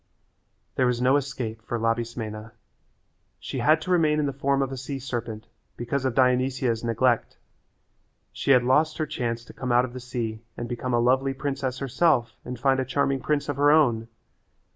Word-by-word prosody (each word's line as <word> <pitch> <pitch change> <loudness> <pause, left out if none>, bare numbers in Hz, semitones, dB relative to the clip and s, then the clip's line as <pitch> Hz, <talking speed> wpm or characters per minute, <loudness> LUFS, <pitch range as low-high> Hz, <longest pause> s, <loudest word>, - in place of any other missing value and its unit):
There 130 - +3
was 125 -1 0
no 130 +2 +4
escape 125 -6 -3
for 120 +2 -4
Labismena. 115 -1 -3 0.9
She - - -5
had 155 +1 +4
to 185 - -4
remain 155 -4 +3
in 150 - +1
the 140 - -2
form 140 0 +1
of 135 - -4
a - - -4
sea 135 +2 -5
serpent 120 -4 -5 0.3
because 130 +3 -2
of 130 -3 0
Dionysia's 125 -2 +2
neglect. 115 +1 +1 1.0
She - - -4
had 125 -3 +6
lost 150 +5 +2
her 155 - 0
chance 120 -4 -3
to - - -13
come 125 -1 -4
out 120 +1 +4
of 120 - -9
the 130 - -6
sea 120 -3 -4 0.2
and 120 - -4
become 120 +1 -2
a - - +3
lovely 130 +3 +2
princess 135 -2 -3
herself 135 -3 +1
and 125 -1 -7
find 135 +1 +2
a - - +1
charming 135 0 0
prince 145 +1 -1
of 145 -2 -3
her 145 +1 +4
own. 120 -8 +3
130 Hz, 185 wpm, -25 LUFS, 120-140 Hz, 1.0 s, had